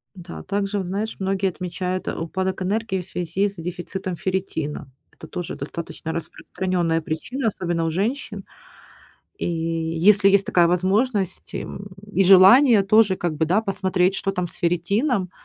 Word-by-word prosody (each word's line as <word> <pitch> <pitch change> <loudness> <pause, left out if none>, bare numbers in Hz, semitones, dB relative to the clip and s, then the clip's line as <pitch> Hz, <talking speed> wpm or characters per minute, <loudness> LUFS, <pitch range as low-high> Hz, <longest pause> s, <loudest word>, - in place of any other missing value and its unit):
Да, 175 -1 -9
также, 200 0 -2
вот 190 - -4
знаешь, 205 +4 -3
многие 195 0 0
отмечают, 185 +1 -4
а, - - -3
упадок 185 +3 -3
энергии 200 0 -1
в - - -11
связи 180 +2 -1
с 200 - -12
дефицитом 180 +2 -5
ферритина. 165 -7 -3 0.2
Это - - -13
тоже 175 -2 -5
достаточно 165 -1 -6
распространённая 170 0 -2
причина, 225 - -3
особенно 175 -5 -1
у 165 - 0
женщин. 205 - -3 0.9
И - - -2
если 165 +4 +2
есть 195 0 +3
такая 175 -1 +4
возможность, 190 +3 0
и, - - -2
м, 200 +1 -8 0.2
и 195 - +3
желание 200 +5 +7
тоже 205 -1 +4
как 175 -3 -2
бы, 160 +1 +1
да, 185 +6 +3
посмотреть, 190 -3 0
что 195 - -1
там 180 -2 -2
с - - -7
ферритином. 190 - 0
185 Hz, 155 wpm, -22 LUFS, 175-200 Hz, 0.9 s, желание